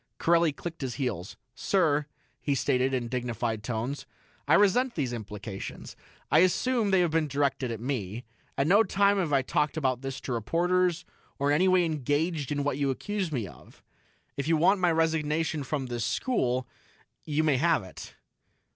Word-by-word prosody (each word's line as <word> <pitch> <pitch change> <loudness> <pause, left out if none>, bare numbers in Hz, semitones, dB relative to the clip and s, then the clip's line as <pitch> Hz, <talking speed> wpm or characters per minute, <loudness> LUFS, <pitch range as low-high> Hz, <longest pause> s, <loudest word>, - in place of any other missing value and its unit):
Corelli 170 -1 +3
clicked 165 +4 -7
his 130 -3 -3
heels. 110 - -4 0.2
"Sir," 150 -4 +1 0.3
he 140 - 0
stated 130 0 +1
in 125 -3 -1
dignified 120 -3 -2
tones, 120 +6 -4 0.4
"I 150 - +5
resent 235 +6 +3
these 130 -6 -1
implications. 105 -3 -7 0.4
I 155 - +6
assume 215 +5 +2
they 190 -2 +4
have 175 -3 +1
been 160 -1 +1
directed 140 -2 0
at 115 -2 -4
me. 120 -3 -3 0.3
At 140 - +2
no 200 +7 +5
time 200 0 +2
have 170 -5 -1
I 135 -2 +3
talked 150 +4 0
about 130 -4 0
this 135 -1 -5
to 130 - -4
reporters, 175 - +1 0.3
or 140 +1 +1
in - - +4
any 185 +5 +3
way 185 -1 +4
engaged 150 0 -1
in 145 -1 0
what 145 -1 -1
you 140 -1 +1
accuse 190 +6 -2
me 120 -8 -2
of. 70 - -16 0.5
If 140 +1 -2
you 165 -1 +3
want 190 +5 +4
my 175 -2 +3
resignation 160 -1 0
from 135 0 -3
this 120 -2 -3
school, 130 - 0 0.6
you 155 0 0
may 150 -4 +3
have 165 - +2
it." 95 - -11
145 Hz, 175 wpm, -28 LUFS, 125-170 Hz, 0.6 s, I